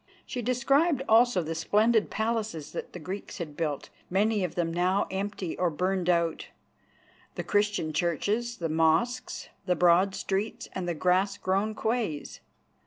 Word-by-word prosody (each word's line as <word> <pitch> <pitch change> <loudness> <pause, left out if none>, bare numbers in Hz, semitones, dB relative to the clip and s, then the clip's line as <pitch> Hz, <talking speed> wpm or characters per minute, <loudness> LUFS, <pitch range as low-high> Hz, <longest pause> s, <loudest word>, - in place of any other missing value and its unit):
She 250 - -4
described 270 +5 +2
also 225 -4 +5
the 160 +1 -3
splendid 215 +7 +2
palaces 220 -8 -2
that - - -6
the - - -6
Greeks 185 +4 -6
had 160 -6 -6
built, 150 -3 -3 0.2
many 205 +2 +2
of 175 -2 -3
them 165 -2 -1
now 180 +3 +2
empty 195 -2 -3
or 180 -1 +3
burned 180 +2 -1
out, 170 -2 +1 0.9
the - - -3
Christian 205 -6 0
churches, 205 +9 0
the 170 - -2
mosques, 165 +11 +1 0.2
the 180 - +3
broad 180 +3 +4
streets 210 +5 -2
and 185 -2 -3
the 175 - -1
grass 185 +4 +2
grown 200 +3 0
quays. 220 -11 -2
190 Hz, 150 wpm, -28 LUFS, 170-220 Hz, 0.9 s, also